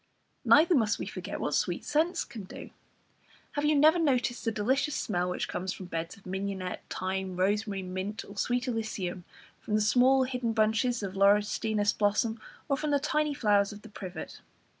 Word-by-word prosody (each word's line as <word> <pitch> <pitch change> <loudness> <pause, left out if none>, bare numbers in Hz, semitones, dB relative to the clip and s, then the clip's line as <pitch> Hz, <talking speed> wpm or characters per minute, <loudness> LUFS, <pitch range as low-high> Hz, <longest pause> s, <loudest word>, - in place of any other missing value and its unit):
Neither 335 +3 +6
must 225 -8 +2
we - - -4
forget - - -6
what - - -2
sweet - - 0
scents 320 +4 +1
can 215 -5 -9
do. - - -10 0.8
Have 290 0 -1
you 300 0 +4
never 310 +4 +5
noticed 250 -6 +1
the 225 - 0
delicious 260 +8 0
smell 180 -3 -1
which 180 - -2
comes 185 +1 -3
from 185 - -8
beds 165 0 -5
of 200 - -20
mignonette, 190 -1 -4
thyme, 190 0 -3
rosemary, 200 +1 0
mint, 185 +3 -4
or 200 - -11
sweet 245 +4 0
alyssum, 200 -7 -3 0.3
from 210 - -2
the - - +3
small 255 +5 +4
hidden 250 -3 -2
bunches 225 +2 +1
of 190 -2 -4
laurustinus 205 +1 +2
blossom, 215 +2 +1 0.3
or 275 - +1
from 300 +1 -2
the 285 -1 +3
tiny 300 +1 0
flowers 205 -5 +2
of 210 0 -11
the 225 - -11
privet? 190 -3 -8
215 Hz, 180 wpm, -29 LUFS, 195-255 Hz, 0.8 s, Neither